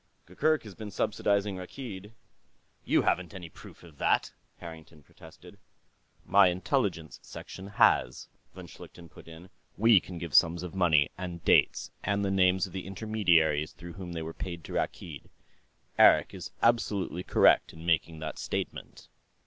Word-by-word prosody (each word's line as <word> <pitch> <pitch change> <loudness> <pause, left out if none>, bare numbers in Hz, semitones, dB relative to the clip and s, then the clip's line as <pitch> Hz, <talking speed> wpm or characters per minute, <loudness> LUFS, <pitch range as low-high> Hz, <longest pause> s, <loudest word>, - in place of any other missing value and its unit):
Gurgurk 155 -1 0
has 105 -3 -11
been 110 +2 -8
subsidizing 100 -1 -1
Rakkeed...." 105 +1 -9 0.7
"You - - +2
haven't 90 +1 -1
any 90 -3 -8
proof - - -15
of 80 -5 -16
that," - - +1 0.2
Harrington 80 -2 -12
protested. - - -16 0.7
"My 100 -1 +5
Intelligence 90 - -2
Section 95 - -10
has," 100 - +2 0.3
von - - -9
Schlichten 85 -1 -13
put - - -16
in. 85 +3 -13 0.3
"We 115 -1 +6
can 90 -1 -10
give 85 -3 -7
sums 85 +1 +4
of 90 - -7
money, 80 -6 +3
and 90 -3 -7
dates, - - +3
and 100 +1 0
the 95 - -1
names 95 -1 +3
of 95 - -12
the 95 -1 -6
intermediaries 90 -7 +1
through 85 -1 -11
whom 90 -2 -8
they 80 -1 -4
were 80 +1 -7
paid 85 -2 -7
to - - -9
Rakkeed. 75 -5 -4 0.7
Eric - - +6
is - - -8
absolutely 105 -6 +1
correct - - +3
in 80 0 -12
making 80 -1 0
that 80 -1 -6
statement." - - -6
90 Hz, 155 wpm, -28 LUFS, 85-100 Hz, 0.7 s, We